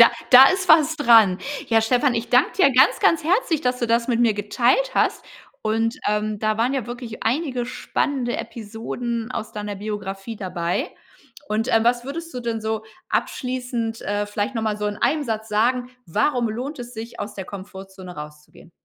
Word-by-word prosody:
Da 235 - +9 0.2
da 260 +1 +11
ist 370 -1 -2
was 315 0 +5
dran. 225 -9 +5 0.3
Ja, 225 -1 +4
Stefan, 250 +3 +2
ich 230 0 -2
danke 250 +5 +4
dir 275 -6 +5
ganz 255 +1 +5
ganz 325 -2 +3
herzlich, 340 -3 +1
dass 250 -2 0
du 240 - -1
das 235 +2 +1
mit 235 -1 +1
mir 225 -3 +3
geteilt 240 - +1
hast - - +1 0.4
und, 225 +2 0
ähm, 210 0 -1
da 215 0 0
waren 240 +4 +1
ja 260 -5 -2
wirklich 240 -2 -7
einige 250 -1 -1
spannende 255 -1 -2
Episoden 230 +1 -5
aus 215 - -5
deiner 210 -1 -5
Biografie 205 +1 -5
dabei. 180 -3 -2 0.6
Und, 220 +2 -1
ähm, 225 0 +4
was 240 0 +2
würdest 330 +4 -6
du 250 - -5
denn 230 -2 -3
so 220 0 -3 0.2
abschließend, 245 -3 -2
äh, 205 +1 -1
vielleicht 205 +4 -3
noch 225 - -2
mal 215 -1 -1
so 210 0 -2
in 205 0 -3
einem 300 -1 +1
Satz 220 -1 -3
sagen, 245 +4 +1 0.2
warum 235 - +1
lohnt 255 +7 -5
es 245 0 -8
sich, 230 +1 -8
aus 205 +1 -5
der 190 - -6
Komfortzone 190 -2 -10
rauszugehen? 150 +2 -11
230 Hz, 185 wpm, -22 LUFS, 210-250 Hz, 0.6 s, da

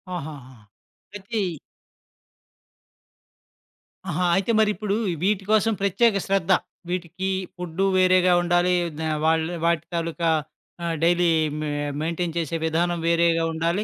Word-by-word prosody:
ఆహాహా! 140 -6 -8 0.6
ప్రతి 205 +2 -4 2.7
ఆహా! 175 +2 0
అయితే 195 +4 +1
మరీప్పుడు 210 -1 +1 0.3
వీటి 200 -1 +1
కోసం 220 +1 +3
ప్రత్యేక 200 +2 +3
శ్రద్ధ. 195 -2 +1 0.4
వీటికి 180 +1 -3 0.3
ఫుడ్డు 180 +1 -2
వేరేగా 185 -1 +4
ఉండాలి. 175 +1 +2
ఏవిద 160 -2 -5 0.2
వాళ్ళు 160 +1 +1
వాటి 170 -1 +1
తాలూకా 165 0 -1 0.5
ఆ 170 - -1 0.2
డెయిలీ 175 +1 +3 0.3
మ-మెయింటెయిన్ 155 +3 -3
చేసే 165 0 -2
విధానం 170 +2 0
వేరేగా 170 0 +3
ఉండాలి. 170 +5 0
175 Hz, 105 wpm, -24 LUFS, 165-190 Hz, 2.7 s, వేరేగా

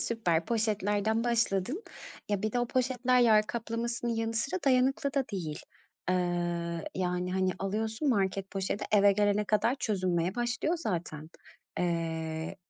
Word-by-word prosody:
Süper, 175 -8 0
poşetlerden 215 0 0
başladın. 235 - 0 0.5
Ya, 205 -1 0
bir 215 0 -1
de 245 - +1
o 240 - 0
poşetler 255 0 +2
yer 215 -3 +5
kaplamasının 235 +1 -2
yanı 225 0 -2
sıra 275 +12 -1
dayanıklı 270 +2 +2
da 275 -1 +2
değil. 165 -6 -3 0.5
Eee, - - +3 0.8
yani, 180 0 -1
hani, 185 0 +1
alıyorsun 220 +7 -1
market 195 -4 0
poşeti, 195 +1 -2
eve 200 -1 +6
gelene 205 +1 +2
kadar 215 +4 +2
çözünmeye 185 -7 0
başlıyor 245 +7 0
zaten. 165 - -4 0.5
Eee, 165 -2 -2
210 Hz, 130 wpm, -30 LUFS, 185-240 Hz, 0.8 s, eve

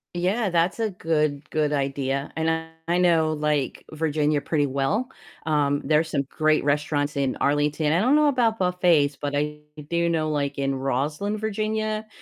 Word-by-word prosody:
Yeah, 195 +4 0
that's 175 +5 +1
a 220 -1 +1
good 155 -5 -1
good 150 -1 +1
idea, 140 -1 -1
and 160 0 0 0.4
I 175 +1 +2
know, 165 -3 +3
like, 150 -3 -1
Virginia 150 -1 0
pretty 145 0 0
well, 140 - 0 0.4
um, 145 -2 +1
there's 155 +2 +2
some 140 -3 0
great 155 +2 +1
restaurants 145 0 0
in 135 -2 0
Arlington, 150 +1 +1
I 170 - +3
don't 255 +7 +3
know 300 0 +4
about 240 -5 +2
buffets, 175 -6 +2
but 145 0 -4
I 150 +1 -2 0.3
do 170 +1 +1
know, 155 -2 0
like, 140 -2 -2
in 135 -1 0
Rosslyn, 145 +10 -2
Virginia, 215 0 -2
155 Hz, 160 wpm, -24 LUFS, 145-180 Hz, 0.4 s, know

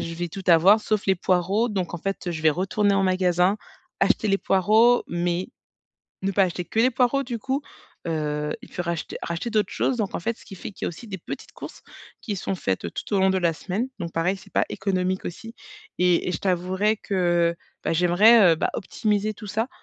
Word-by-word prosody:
je 165 - -4
vais 175 +1 -3
tout 190 +3 -8
avoir 180 +5 +6
sauf 215 -1 -1
les 190 - +3
poireau, 185 +6 +1
donc 190 -5 -3
en - - -4
fait 195 0 -3
je 160 -2 -5
vais 160 - +5
retourner 195 +5 +1
en 195 - +2
magasin, 185 +1 +2 0.4
acheter 215 - +2
les 195 0 +2
poireaux 215 +7 +4
mais 175 +1 -1 0.7
ne 195 - 0
pas 195 0 +4
acheter 180 -1 -3
que 220 - -5
les 250 +3 +4
poireaux 255 +2 +2
du 240 -2 -4
coup. 265 +5 -2 0.5
Heu, 150 -2 -2
il 250 - -13
peut 175 - -4
racheter 170 -2 -4
racheter 170 +7 -3
d'autres 215 -2 0
choses 260 - 0
donc 215 -4 -2
en - - -2
fait, 225 +6 -2
ce - - -17
qui 195 - -11
fait 200 - -7
qu'il - - -7
y - - 0
a - - 0
aussi 175 +8 -11
des 195 - -5
petites 175 - -8
courses - - -10 0.4
qui 210 -4 -4
sont 195 - -3
faites 95 - -3
tout - - -4
au - - +3
long 190 0 +4
de 190 - +1
la 170 -2 +1
semaine. 200 +9 -3
Donc 170 -3 -5
pareil, 180 +4 0
c'est 190 - -17
pas - - +2
économique 185 -1 -1
aussi. 225 +6 -7 0.4
Et 180 -1 +2
et - - -1
je - - -1
t'avouerais 190 +3 0
que, 175 -4 +1 0.3
bah, - - 0
j'aimerais, 180 +4 +6
heu - - +4
bah, - - 0
optimiser 210 +2 -1
tout 215 0 -11
ça, 220 +4 -1
190 Hz, 225 wpm, -24 LUFS, 175-210 Hz, 0.7 s, avoir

